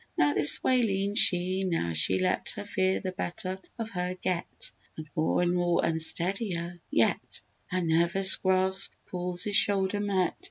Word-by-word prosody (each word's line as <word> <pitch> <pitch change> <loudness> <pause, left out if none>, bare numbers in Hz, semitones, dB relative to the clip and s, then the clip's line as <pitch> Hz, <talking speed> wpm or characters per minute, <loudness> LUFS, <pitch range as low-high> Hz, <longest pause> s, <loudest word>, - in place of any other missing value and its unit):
Now 145 0 +1
this 150 - +8
way 255 -1 +1
leaned 200 -2 0
she, 185 +2 +2
now 165 - -3
she 80 0 +1
let 185 0 -2
Her 205 -1 -8
fear 190 -2 -2
the 185 - -6
better 185 +1 -6 0.2
of 225 -1 -7
her 180 0 -5
get, 180 -1 -6 0.3
And 155 -1 -9
more 160 +2 -1
and 175 0 -1
more 175 -1 -1
unsteadier 170 +2 -2 0.2
yet, 115 - -2 0.3
Her 185 0 -3
nervous 170 +4 +6
grasp 190 0 0 0.2
Paul's 180 0 -2
shoulder 200 -1 0
met! 195 -3 -2
185 Hz, 155 wpm, -26 LUFS, 175-195 Hz, 0.3 s, this